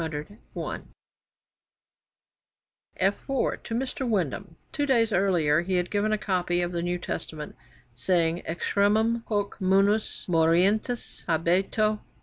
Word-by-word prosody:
[F 155 -2 -4 0.3
4] - - -4 2.8
To 225 - -6
Mr. 260 0 -2
Windham, 185 - -2 0.2
two 290 -1 -1
days 230 -5 +3
earlier, 170 -5 +3
he 185 +2 -1
had 180 0 0
given 210 +1 +1
a 215 - +2
copy 180 -3 0
of 175 - -2
the 170 -1 -2
New 175 +1 -1
Testament, 155 -3 -6 0.4
saying: 165 +6 +1
'Extremum 215 +7 +1
hoc 205 -2 -1
munus 195 +3 +2
morientis 180 +8 +1
habeto.' 190 +6 +1
190 Hz, 115 wpm, -26 LUFS, 170-215 Hz, 2.8 s, days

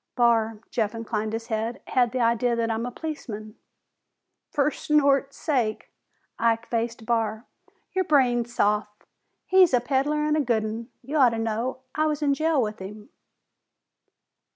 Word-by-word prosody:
"Barr," 225 -3 +2
Jeff 220 -1 -1
inclined 220 -1 -3
his 225 +1 -4
head, 225 0 -2
"had 245 -3 +2
the 255 - -2
idea 235 +1 +2
that 230 -1 0
I'm 225 +2 -2
a - - -5
policeman." 225 -8 -6 0.9
"Fer 295 0 +1
snort's 280 -2 +2
sake!" 245 -8 -1 0.5
Ike 230 0 +2
faced 230 -1 -3
Barr. 225 0 -1 0.5
"Your 375 - +2
brain 255 -6 +3
soft? 210 -2 -1 0.4
He's 370 -7 +5
a - - +4
peddler 285 +4 0
an' 300 0 +2
a 310 - +2
good 235 -5 +1
'un. 225 +2 -5 0.2
I 285 - -6
ought 270 -5 +6
to 230 - -4
know. 225 +4 -2
I 310 0 +1
was 300 0 -1
in 285 -1 +3
jail 315 +1 +1
with 215 -2 -1
him." 210 +2 -9
235 Hz, 155 wpm, -25 LUFS, 225-280 Hz, 0.9 s, ought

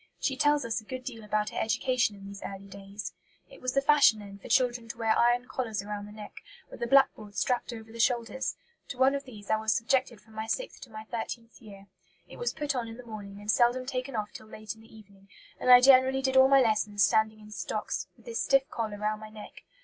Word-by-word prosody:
She 270 - 0
tells 290 0 +2
us 230 -1 -2
a - - -19
good 255 +3 -7
deal 235 -4 -7
about 210 0 -1
her - - -3
education 235 0 +1
in 195 0 -12
these 200 0 -9
early 195 0 -7
days. 200 +1 -8 0.4
"It - - -14
was 255 0 -2
the 275 - +2
fashion 285 -6 +6
then 200 -1 -10
for - - -11
children 240 -2 +2
to 235 - -6
wear 225 -1 +2
iron 240 +1 +3
collars 220 -3 -3
round 205 0 -5
the - - -11
neck, 210 0 -10 0.3
with - - -11
a 235 - 0
backboard 225 -6 +3
strapped 245 +6 0
over 225 -1 -9
the 230 - -10
shoulders; 240 +2 0 0.3
to 250 - -7
one 260 +2 +4
of 280 0 -3
these 215 -5 -8
I 220 - +4
was 220 0 +1
subjected 255 -1 0
from 220 +1 -21
my 220 0 -5
sixth - - -3
to - - -24
my 215 -1 -8
thirteenth 230 +1 -6
year. 200 -3 -13 0.4
It - - -12
was 485 - -1
put 295 -2 -2
on 245 -3 -2
in 225 0 -9
the 250 - -11
morning, 205 -3 -8
and 205 +1 0
seldom 245 +2 +3
taken 255 0 -4
off 210 -1 -3
till 220 - -11
late 215 0 -7
in 220 - -18
the 225 - -18
evening, 200 -2 -17 0.3
and - - -1
I 250 0 +11
generally 265 0 +6
did 265 0 0
all 265 0 +8
my 275 0 +6
lessons 210 -3 +2
standing 220 +3 +2
in 210 0 -14
stocks, - - -3
with - - -22
this 465 -1 -3
stiff 275 0 +3
collar 220 -3 -3
round 215 +1 -2
my 215 - -9
neck. 215 -1 -12
225 Hz, 245 wpm, -29 LUFS, 210-255 Hz, 0.4 s, I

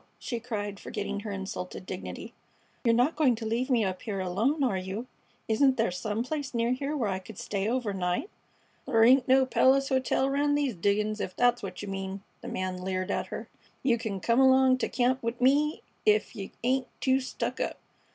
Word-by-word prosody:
she 240 -3 -4
cried, 205 -4 -4
forgetting 205 0 -4
her 205 0 -5
insulted 190 -1 -5
dignity, 185 0 -7 0.5
"you're 235 - +4
not 245 +7 +3
going 280 -6 +3
to 225 0 -6
leave 235 +4 -1
me 235 -5 +3
up 185 -1 -3
here 205 -4 -3
alone, 220 - +1
are 240 -7 +2
you? 190 +5 -4 0.4
Isn't 260 +4 +3
there 225 -4 +2
some 210 +5 -2
place 280 -1 -4
near 235 +1 +1
here 280 +4 -1
where 235 -6 0
I 190 - -2
could 190 +2 -12
stay 200 +1 -2
overnight?" 205 - -1 0.6
"Thur 225 0 +4
ain't 255 +3 +6
no 265 0 +5
palace 270 +1 +3
hotel 260 0 +1
round 290 +1 +2
these 285 -4 0
diggin's, 210 +3 0
ef 185 - -4
that's 245 0 +3
what 190 0 -6
you - - -5
mean," 195 0 -5 0.2
the - - -8
man 185 -1 -3
leered 185 0 -2
at - - -1
her. - - -6 0.4
"You 240 -3 +3
c'n 200 -4 -4
come 235 +2 +2
along 260 -1 +5
t' - - -1
camp 255 +1 +1
'ith 230 +2 -2
me 290 +5 +3 0.2
ef 210 +2 +3
you 195 -3 -6
ain't 260 +1 +1
too 260 0 +3
stuck 260 - -4
up." - - -2
230 Hz, 200 wpm, -28 LUFS, 200-260 Hz, 0.6 s, ain't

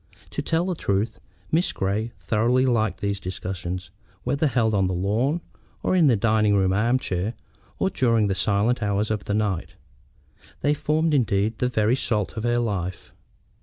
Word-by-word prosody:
To - - -2
tell 165 +1 0
the 185 - -1
truth, 105 - -1 0.3
Miss 170 +3 +2
Grey 105 +4 -1
thoroughly 120 +4 +2
liked 110 -5 +1
these 100 -1 -1
discussions, 90 -1 -5 0.3
whether 140 +5 +1
held 115 -5 +1
on 95 -2 +2
the 90 - -1
lawn, 115 - 0 0.4
or - - +2
in 170 -4 +5
the 125 - +5
dining 110 -1 +3
room 95 -1 +3
arm 115 +6 +2
chairs, 100 -1 -2 0.4
or 195 - 0
during 115 -8 +2
the 100 - +1
silent 105 +5 +1
hours 105 +1 0
of 105 -2 -2
the 100 - -1
night. 105 -5 -1 0.9
They 145 - +3
formed, 155 +2 +1
indeed, 110 -4 +1
the 125 - +2
very 115 -1 +2
salt 110 -6 -1
of 110 - -3
her 120 0 +2
life. 95 -6 -3
110 Hz, 170 wpm, -24 LUFS, 100-125 Hz, 0.9 s, in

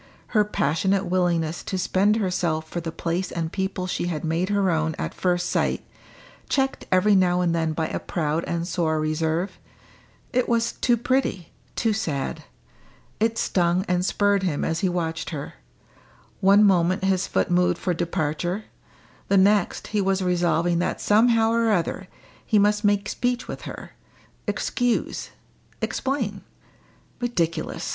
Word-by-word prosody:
Her 215 -3 +3
passionate 190 +1 0
willingness 175 -2 0
to 190 - -2
spend 195 +3 +2
herself 175 -6 -1
for 175 +2 -4
the 165 -1 -4
place 170 +3 -2
and 165 -1 -3
people 190 -1 -2
she 175 -1 -2
had 160 -4 -3
made 165 +4 0
her 200 -2 +2
own 160 -1 0
at - - -3
first 180 -1 0
sight, - - 0 0.6
checked 270 -1 0
every 185 +3 +4
now 180 -2 +3
and 175 -2 +1
then 160 -1 0
by 160 0 -1
a - - -3
proud 160 -1 -2
and 170 0 -2
sore 160 -4 0
reserve 160 +4 -1 0.7
it 250 0 +1
was 230 0 +2
too 240 -2 +1
pretty, 240 -7 -1 0.2
too 225 -2 +1
sad. 155 -11 -3 0.8
It 225 +1 +1
stung 180 -1 +1
and 180 0 +1
spurred 200 +1 +2
him 175 -6 -1
as 165 0 -1
he 190 - +1
watched 165 -2 -2
her; 145 -3 -6 0.9
one 200 +2 +6
moment 185 -2 +3
his 190 -1 +1
foot - - 0
moved 175 0 +3
for 180 - -1
departure, 175 +3 -2 0.6
the 200 - +3
next 200 0 +2
he 210 - +2
was 195 0 +1
resolving 175 -1 +1
that 175 - -1
somehow 225 +1 +4
or 230 0 +2
other 185 0 -1 0.4
he 220 - +2
must 210 +1 +3
make 205 0 +2
speech 245 +2 -1
with - - -6
her - - -9 0.6
excuse 245 -2 -1 0.5
explain. 235 -8 -2 0.8
Ridiculous! 175 -10 -2
185 Hz, 150 wpm, -24 LUFS, 170-205 Hz, 0.9 s, one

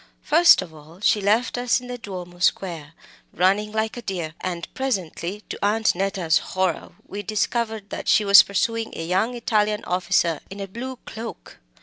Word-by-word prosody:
First 335 +3 +6
of 160 - -13
all, 155 +3 -15
she 210 0 +2
left 220 +5 +1
us 245 0 +2
in 250 - -12
the 250 0 -5
Duomo 180 -4 -8
Square, 170 -4 -1 0.4
running 200 +4 +1
like 220 0 -1
a 240 - -6
deer, 175 -7 -4
and 175 -2 -4
presently, 200 -6 -3
to - - -6
Aunt 215 +2 +2
Neta's 190 -3 +1
horror, 185 -3 -2
we 205 - -6
discovered 215 0 -2
that - - -5
she 215 - +4
was 200 0 +10
pursuing 225 +3 -1
a 165 - -4
young 195 +8 0
Italian 215 -3 0
officer 175 -3 +1
in 195 +1 -9
a 195 - -4
blue 255 +6 -6
cloak. 230 +1 -9
200 Hz, 175 wpm, -23 LUFS, 180-225 Hz, 0.4 s, was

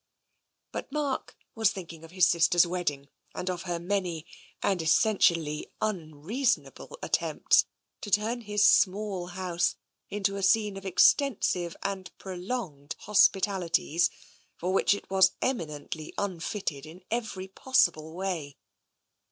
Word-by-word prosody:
But - - -6
Mark 285 -2 -2 0.2
was 220 -2 +3
thinking 170 -4 -9
of 165 - -11
his 180 0 +4
sister's 175 0 +4
wedding 160 -6 -3 0.3
and 185 +1 -2
of 175 -1 -5
her 175 - 0
many, 175 -3 -2 0.4
and 190 -4 +1
essentially 160 -4 +2
unreasonable, 215 - -2
attempts - - +2 0.4
to 210 - -6
turn 220 +4 +1
his 210 -1 +2
small 190 -2 +3
house 180 -1 -1 0.3
into 200 -1 -1
a - - -4
scene 210 +1 +3
of 195 0 -7
extensive 185 - +3
and 195 -2 -4
prolonged 180 - -5
hospitalities 190 -5 +2 0.5
for 180 +2 -2
which 195 - +3
it - - -10
was 190 -1 +5
eminently 155 - -4
un 190 -4 -2
fitted 160 -6 -4
in 175 +4 -13
every 220 -5 -3
possible 175 -8 +1
way. 175 -7 -4
185 Hz, 125 wpm, -28 LUFS, 170-205 Hz, 0.5 s, was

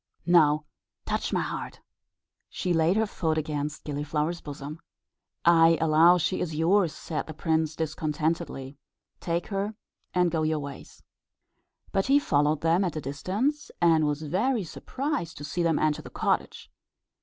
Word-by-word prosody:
"Now 155 -4 +4 0.4
touch - - -2
my - - +1
heart." - - -5 0.7
She 180 - -1
laid 165 +4 +3
her 220 - +3
foot 160 -6 -1
against 150 0 -3
Gilliflower's 150 +3 -2
bosom. 145 +1 -7 0.7
"I 165 -1 +6
allow 165 +2 +6
she 180 +2 -1
is 160 -3 -3
yours," 170 +2 +3
said 155 0 -5
the 155 - -8
prince, 160 -1 0
discontentedly. 155 -3 -2 0.4
"Take 170 0 -2
her 200 +1 -2 0.4
and 180 -1 +2
go 160 -1 0
your 155 0 +1
ways." 140 -2 -9 0.9
But 195 +3 0
he 275 +2 +6
followed 150 - +2
them 165 +4 +3
at 175 -4 -2
a - - -1
distance, 205 - -2
and 160 -3 +4
was 150 +1 -2
very 215 - 0
much 170 - -7
surprised 270 - -4
to 145 - -8
see 155 +4 -2
them 165 -2 +2
enter 155 -1 +1
the - - -10
cottage. - - -2
160 Hz, 155 wpm, -27 LUFS, 150-180 Hz, 0.9 s, I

